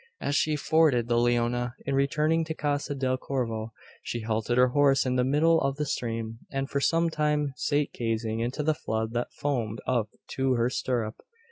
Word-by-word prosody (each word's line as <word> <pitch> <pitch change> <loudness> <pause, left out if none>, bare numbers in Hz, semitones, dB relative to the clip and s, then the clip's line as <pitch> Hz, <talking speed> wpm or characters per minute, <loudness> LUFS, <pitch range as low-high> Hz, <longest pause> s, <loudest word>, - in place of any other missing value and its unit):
As 140 - -1
she 155 +1 +2
forded 150 -5 +3
the 120 0 +2
Leona, 120 0 +1
in 140 - -1
returning 150 +4 +2
to 160 0 -4
Casa 145 -1 -1
del 130 -1 0
Corvo, 115 -5 -3 0.3
she 120 - -4
halted 110 +2 -1
her 125 0 +5
horse 140 0 +3
in 125 -1 0
the 125 - +3
middle 155 +5 +3
of 135 0 0
the 150 +1 -2
stream; 115 -4 -3
and 135 0 -2
for 140 - -1
some 165 +3 +2
time 150 -2 0
sate 145 -1 0
gazing 115 -1 -2
into 125 +6 -2
the 155 +1 +2
flood 110 -5 -3
that 120 0 -2
foamed 115 -7 -2
up 120 -4 0 0.2
to 135 -1 +1
her 120 +1 +1
stirrup. 115 -4 -2
130 Hz, 190 wpm, -27 LUFS, 120-145 Hz, 0.3 s, her